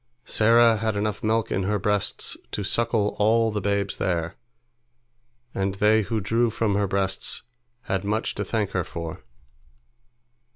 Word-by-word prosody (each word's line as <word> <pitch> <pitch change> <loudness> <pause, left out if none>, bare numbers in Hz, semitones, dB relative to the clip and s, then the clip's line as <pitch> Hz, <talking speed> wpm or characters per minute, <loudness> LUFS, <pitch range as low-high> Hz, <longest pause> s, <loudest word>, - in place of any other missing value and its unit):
Sarah 115 +1 +4
had 110 0 -1
enough 105 0 -2
milk 110 +1 0
in 95 - 0
her 105 +3 0
breasts 105 0 0 0.2
to 105 - -2
suckle 110 0 +1
all 110 +2 +3
the 105 -1 -2
babes 100 0 -1
there, 85 -2 -1 1.2
and 95 0 -1
they 105 +2 +4
who 110 +2 -2
drew 115 +4 +1
from 110 -1 0
her 100 0 +1
breasts 95 -1 -1 0.4
had 95 0 -2
much 105 +3 -1
to - - -3
thank 105 -4 -1
her 90 - 0
for. 85 -3 -7
105 Hz, 150 wpm, -25 LUFS, 95-110 Hz, 1.2 s, Sarah